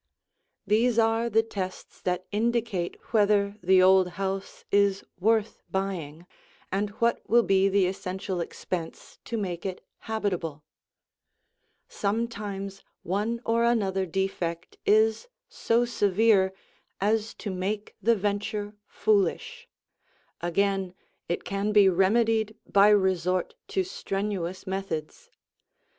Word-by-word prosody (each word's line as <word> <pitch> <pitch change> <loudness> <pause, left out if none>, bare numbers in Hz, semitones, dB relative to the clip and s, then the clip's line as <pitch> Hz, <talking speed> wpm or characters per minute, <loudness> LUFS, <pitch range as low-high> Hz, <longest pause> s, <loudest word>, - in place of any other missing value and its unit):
These 225 +3 +2
are 225 +1 +2
the 225 0 +3
tests 190 -4 -6
that 180 0 -1
indicate 225 -4 -1 0.2
whether 205 -1 +3
the 185 +1 +5
old 190 0 +6
house 195 0 -4
is 200 -1 +3 0.2
worth 220 +2 +1
buying 175 -5 -3 0.5
and 200 +2 0
what 235 0 +1
will 235 +1 +5
be 195 -1 +3
the 195 -1 +3
essential 185 0 -3
expense 170 0 -6
to 230 - -3
make 180 -5 -3
it 190 -2 -5
habitable. 180 -9 -3 1.2
Sometimes 200 -2 -3 0.2
one 210 +6 -1
or 230 +1 +2
another 195 -5 +1
defect 180 -1 -3
is 220 - +3 0.2
so 235 +1 +1
severe 205 -3 +3 0.5
as 215 +2 0
to 205 - -5
make 200 +3 -3
the 230 +3 +4
venture 205 +1 -2
foolish; 215 - 0 0.7
again 190 +1 0 0.3
it 175 - -1
can 200 +2 -1
be 205 -2 +6
remedied 220 +4 +2
by 200 +1 +5
resort 185 - +2
to 380 - 0
strenuous 195 - -3
methods. 190 -5 -5
200 Hz, 110 wpm, -27 LUFS, 190-220 Hz, 1.2 s, old